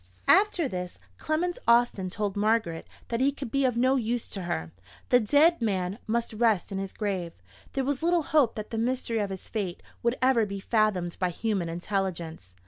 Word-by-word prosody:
After 390 -7 +4
this, 180 -5 -5 0.2
Clement 345 +3 -1
Austin 235 -5 +3
told 205 +1 -2
Margaret 210 -5 0 0.2
that 230 +1 -1
he 275 +2 +4
could 275 -4 -7
be 275 -1 +2
of 250 -2 +1
no 260 +2 +3
use 235 -1 -1
to 195 - -5
her. 80 - -3 0.4
The 245 - +6
dead 295 +7 +4
man 195 -2 -1
must 230 +1 -1
rest 215 -3 +1
in 195 - -2
his 195 -1 -4
grave: 190 -5 -3 0.4
there 270 - 0
was 280 -1 -1
little 340 0 +2
hope 285 -6 +2
that 215 -1 -6
the 225 - -2
mystery 235 -1 0
of 205 -2 -1
his 190 -1 -7
fate 195 -6 -4 0.2
would 235 +1 +1
ever 255 -4 +3
be 200 0 -5
fathomed 195 -5 0
by 180 -1 +1
human 190 -1 -2
intelligence. 170 - -4
220 Hz, 190 wpm, -27 LUFS, 190-255 Hz, 0.4 s, The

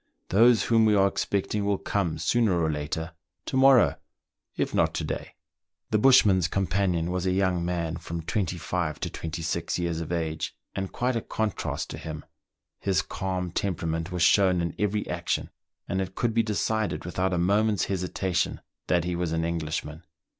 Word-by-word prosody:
Those 115 +4 +5
whom 115 -1 +4
we 105 -1 +4
are 100 -1 +5
expecting 100 +1 -1
will 100 -1 +1
come 95 -6 -1
sooner 110 -7 +2
or 80 -1 +1
later 80 +2 -4 0.2
— - - -57
to - - -4
morrow, 130 -2 +6 0.6
it - - -1
not - - +2
to - - -2
day." - - -5 0.6
The 110 - +3
bushman's 105 -8 +5
companion 90 -3 0
was 90 0 -1
a - - +2
young 95 -2 +1
man, 85 -2 -2
from 85 -1 -6
twenty 95 -2 -1
five 85 -2 -2
to - - -3
twenty 80 0 -5
six 80 +1 -1
years 85 -2 -2
of 80 - -5
age, 80 -2 -2 0.2
and 95 -1 -4
quite 125 0 -1
a 115 - 0
contrast 110 -3 -3
to - - -6
him. 80 -1 -7 0.5
His 95 -4 +1
calm 90 -2 -3
temperament 85 -2 -2
was 90 -2 0
shown 95 -2 +5
in 85 0 -1
every 105 0 0
action; - - -2 0.4
and 95 +1 -1
it 95 0 -5
could 120 -2 0
be 115 - +4
decided 110 -5 -1
without 90 +2 -1
a 90 - 0
moment's 100 +4 +2
hesitation 90 -1 -1 0.3
that 85 -2 +2
he 90 0 -2
was 85 -1 -1
an 80 0 0
Englishman. 80 -1 -3
90 Hz, 180 wpm, -27 LUFS, 85-100 Hz, 0.6 s, morrow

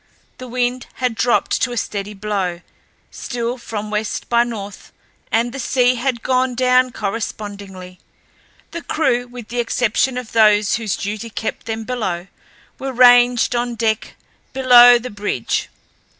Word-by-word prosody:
The 255 - -8
wind 245 +1 -2
had 250 -2 -1
dropped 235 +3 +1
to 250 - +1
a - - -5
steady 205 -1 -4
blow, 195 -4 -3 0.5
still 245 0 -4
from 215 -2 -6
west 210 0 -3
by 235 0 +4
north, 205 -4 -8 0.4
and 235 +2 +1
the 275 - -6
sea 250 0 +2
had 245 -1 -2
gone 255 -1 +1
down 255 0 +3
correspondingly. 200 -4 -6 0.7
The 340 - -6
crew, 245 -8 0
with 245 -2 -10
the 240 +1 -3
exception 240 +2 0
of 250 -3 -6
those 210 -2 +4
whose 220 -4 -2
duties 215 +2 -5
kept 220 - -4
them 225 0 -3
below, 210 -8 -3 0.5
were 270 0 -4
ranged 245 -1 +5
on 240 0 -1
deck 220 -1 -1 0.4
below 245 -2 +7
the 250 +1 -7
bridge. 205 - -2
235 Hz, 145 wpm, -19 LUFS, 210-250 Hz, 0.7 s, below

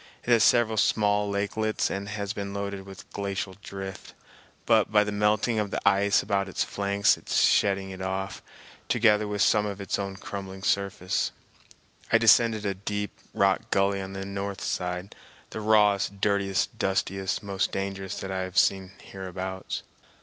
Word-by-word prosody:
It 125 - -1
has 115 -3 +6
several 115 0 +4
small 105 -1 +2
lakelets 105 +2 -1
and 100 +1 -4
has 105 -1 -3
been 100 -1 -5
loaded 100 -1 -4
with 95 -2 -11
glacial 100 -1 -3
drift, 95 -1 -8 0.5
but 110 -3 +3
by 105 -1 +5
the 105 - -3
melting 105 +2 +1
of 105 -1 -1
the - - -2
ice 100 +1 +4
about 100 -1 0
its - - 0
flanks 100 0 +1
is - - -2
shedding 95 -1 +3
it 95 0 -8
off, 95 +1 -3 0.5
together 105 0 +3
with 105 0 +1
some 105 0 +3
of 100 -1 -5
its 100 - -2
own 100 -1 -3
crumbling 95 -1 -7
surface. 100 -2 0 0.8
I 115 - +7
descended 115 -1 +4
a 100 - 0
deep 105 +1 -3 0.2
rock 95 -1 +2
gully 100 0 +2
on 95 0 -7
the 95 0 -5
north 100 0 -4
side, 90 +1 -3 0.4
the 110 - -5
rawest, 105 -2 +3
dirtiest, 100 -2 0
dustiest, 95 +1 -1
most 100 -1 -1
dangerous 95 -1 -4
that 95 - -5
I 95 0 -2
have 95 0 -5
seen 95 -1 +2
hereabouts. 95 0 -5
100 Hz, 165 wpm, -27 LUFS, 95-105 Hz, 0.8 s, I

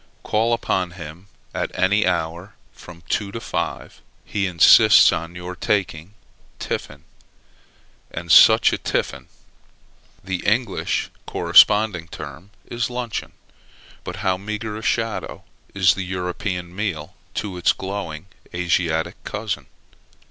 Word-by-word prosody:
Call 110 +2 +1
upon 95 -6 -1
him 85 +3 -10 0.3
at - - -2
any 105 +3 +2
hour 85 +4 -2 0.2
from 85 -1 -13
two 100 -1 -1
to 115 - -4
five, - - -4 0.2
he 100 -2 -1
insists 85 -3 +7
on 85 +2 -5
your 90 +1 -7
taking 95 -2 -2 0.4
tiffin: - - -5 1.1
and 85 0 -5
such - - +7
a - - -2
tiffin! - - -2 1.0
The 95 -1 -2
English 110 -1 0 0.2
corresponding 105 -5 +4
term 75 +4 -9 0.2
is 120 0 -3
luncheon: 120 -3 -4 0.7
but - - -6
how 95 -1 +2
meagre 105 +2 -5
a 110 - -6
shadow 115 0 -2 0.3
is 95 -2 +5
the 95 - -5
European 90 0 -4
meal 90 -7 -3 0.2
to 100 -4 -4
its 90 - +3
glowing 95 -5 -5 0.3
Asiatic 85 -2 -1
cousin! - - -4
95 Hz, 120 wpm, -22 LUFS, 85-105 Hz, 1.1 s, insists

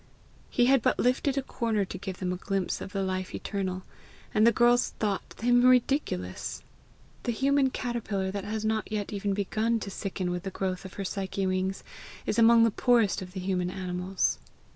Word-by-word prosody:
He 245 - +3
had 265 0 +5
but - - +2
lifted 260 +2 +1
a 275 - +1
corner 220 -5 -1
to - - -7
give 190 -1 -5
them 180 -1 -2
a - - -2
glimpse 195 0 -2
of 190 - -6
the 195 -1 -1
Life 185 0 -3
eternal, 185 -2 -3 0.5
and 215 +1 +5
the - - +7
girls 240 +1 +3
thought 205 -3 -2
him 245 +1 +4
ridiculous! 250 - +1 0.6
The 240 - -1
human 275 +3 +2
caterpillar 220 -7 -2
that 200 0 -4
has 215 +1 -3
not 220 -1 -1
yet 210 -1 -2
even 200 -1 -1
begun 220 +3 0
to 200 - -5
sicken 190 -2 -3
with 180 0 -2
the 195 - -4
growth 185 0 -3
of 190 - -8
her 200 - -4
psyche 195 0 -2
wings, 185 +1 -1 0.4
is - - 0
among 230 0 +7
the 230 - +4
poorest 230 -3 +3
of 180 -1 -8
the 190 - -4
human 180 -1 -1
animals! 185 0 -1
200 Hz, 190 wpm, -28 LUFS, 190-235 Hz, 0.6 s, the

